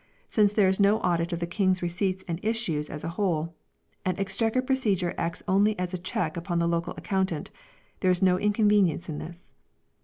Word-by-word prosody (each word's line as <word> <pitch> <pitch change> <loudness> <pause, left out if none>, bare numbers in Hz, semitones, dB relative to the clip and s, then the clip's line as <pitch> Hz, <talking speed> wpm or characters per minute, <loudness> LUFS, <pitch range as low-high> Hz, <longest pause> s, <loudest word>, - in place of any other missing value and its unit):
Since 210 -2 +3
there 205 -2 +4
is 190 +1 +1
no 205 +2 +4
audit 170 0 0
of 170 - -2
the - - +1
King's 185 0 +1
Receipts 185 +2 -1
and 165 -1 -3
Issues 210 -10 -1
as 150 - -6
a - - -2
whole, 170 -3 -1 0.5
and 185 +1 -1
Exchequer 225 +6 0
procedure 210 -10 0
acts 170 0 -3
only 205 +3 +3
as 180 0 -3
a 185 - -2
check 175 -3 -2
upon 175 0 -2
the 170 0 +2
local 170 +1 -1
accountant, 190 -5 -2 0.5
there 185 - +2
is 180 -1 +3
no 185 -1 +4
inconvenience 205 -5 +2
in 150 - -4
this. 175 +2 -10
185 Hz, 190 wpm, -27 LUFS, 170-205 Hz, 0.5 s, there